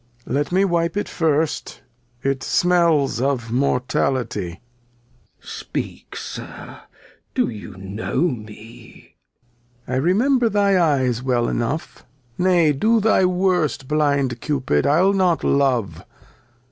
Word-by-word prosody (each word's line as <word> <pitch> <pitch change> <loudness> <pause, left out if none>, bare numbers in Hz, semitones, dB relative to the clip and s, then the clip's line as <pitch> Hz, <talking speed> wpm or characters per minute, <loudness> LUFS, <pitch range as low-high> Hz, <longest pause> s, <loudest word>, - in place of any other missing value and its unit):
Lear. 130 - -1
Let 145 - -2
me 190 +2 +3
wipe 170 -1 0
it 205 - -1
first; 160 -2 -1 0.4
it 135 -1 0
smeUs 170 -8 +2
of 130 -4 -1
Mortality. 125 -7 -1 0.8
Glost. - - -9
Speak, - - -6
Sir, - - -8 0.6
do - - +2
you 105 -4 -9
know 95 +7 -3
me? 115 -7 -6 0.7
Lear. 130 - -1
I - - +2
remember 230 - +2
thy 200 -2 +2
Eyes 130 -6 +1
well 125 -2 0
enough: 120 +7 -3 0.3
Nay, 175 -3 +3
do 225 +11 +2
thy 215 -3 +3
worst, 180 -7 0
blind 140 -5 0
Cupid, 130 - 0
I'll 180 +7 +4
not 185 -4 +1
love. 125 - +1
145 Hz, 120 wpm, -21 LUFS, 125-180 Hz, 0.8 s, I'll